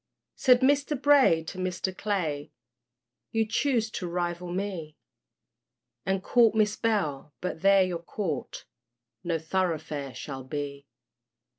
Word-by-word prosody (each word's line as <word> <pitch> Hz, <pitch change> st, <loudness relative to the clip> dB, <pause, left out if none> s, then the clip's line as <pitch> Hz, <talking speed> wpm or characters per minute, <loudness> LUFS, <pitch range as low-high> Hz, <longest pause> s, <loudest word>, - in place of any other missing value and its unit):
Said 250 Hz, -1 st, +5 dB
Mr. 285 Hz, +1 st, +2 dB
Bray 275 Hz, -, +5 dB
to 185 Hz, +4 st, -7 dB
Mr. 185 Hz, 0 st, -2 dB
Clay, 170 Hz, -9 st, -2 dB, 0.8 s
You 225 Hz, 0 st, +1 dB
choose 225 Hz, -1 st, +1 dB
to 180 Hz, -, -4 dB
rival 175 Hz, 0 st, -3 dB
me, 180 Hz, -5 st, -4 dB, 1.1 s
And 190 Hz, 0 st, 0 dB
court 230 Hz, -1 st, +4 dB
Miss 215 Hz, -1 st, +3 dB
Bell, 155 Hz, -, -1 dB
but 180 Hz, -3 st, -4 dB
there 195 Hz, 0 st, +6 dB
your 175 Hz, -2 st, -3 dB
court 170 Hz, -4 st, -4 dB, 0.6 s
No 170 Hz, -1 st, 0 dB
thoroughfare 160 Hz, -5 st, -2 dB
shall 135 Hz, -3 st, -6 dB
be. 140 Hz, +1 st, -5 dB
185 Hz, 120 wpm, -28 LUFS, 160-215 Hz, 1.1 s, there